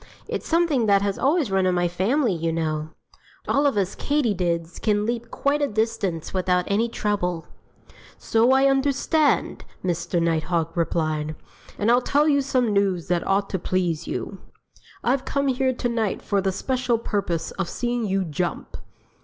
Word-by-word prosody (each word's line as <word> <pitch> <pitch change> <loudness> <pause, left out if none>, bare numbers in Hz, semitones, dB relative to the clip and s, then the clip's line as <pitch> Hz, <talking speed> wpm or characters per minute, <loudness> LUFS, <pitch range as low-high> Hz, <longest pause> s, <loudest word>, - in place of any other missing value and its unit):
It's - - -4
something 320 -9 +2
that 200 -1 +4
has 200 -1 -1
always 285 - +2
run 190 -1 +2
in 180 - +2
my 175 0 +2
family, 210 - +1
you 165 -1 -1
know. 155 -1 -2 0.6
All 285 +1 +3
of 275 - 0
us 195 -1 0
Katydids 180 - -1
can 210 -1 +1
leap 235 +1 -3
quite 285 +1 0
a 285 - +2
distance 205 - -2
without 180 -1 +1
any 220 +4 +1
trouble." 180 -7 -2 0.7
"So 230 +3 +2
I 265 +1 +5
understand!" 280 +2 +1 0.2
Mr. 175 0 -1
Nighthawk 165 0 0
replied. 155 -2 -1 0.4
"And 210 +3 +2
I'll 245 +1 +4
tell 290 +4 +2
you 285 -2 +3
some 255 -5 +1
news 195 -4 0
that 175 -2 0
ought 195 +1 +2
to 190 - -1
please 175 -3 -1
you: 195 - -4 0.6
I've 255 +2 +1
come 280 0 0
here 260 0 +1
to 250 -1 -2
night 225 -3 -1
for 200 -1 +1
the 190 0 0
special 255 +3 0
purpose 195 -7 -2
of 190 -3 -3
seeing 240 -2 -2
you 195 0 +1
jump!" 165 +1 -3
200 Hz, 165 wpm, -24 LUFS, 175-255 Hz, 0.7 s, I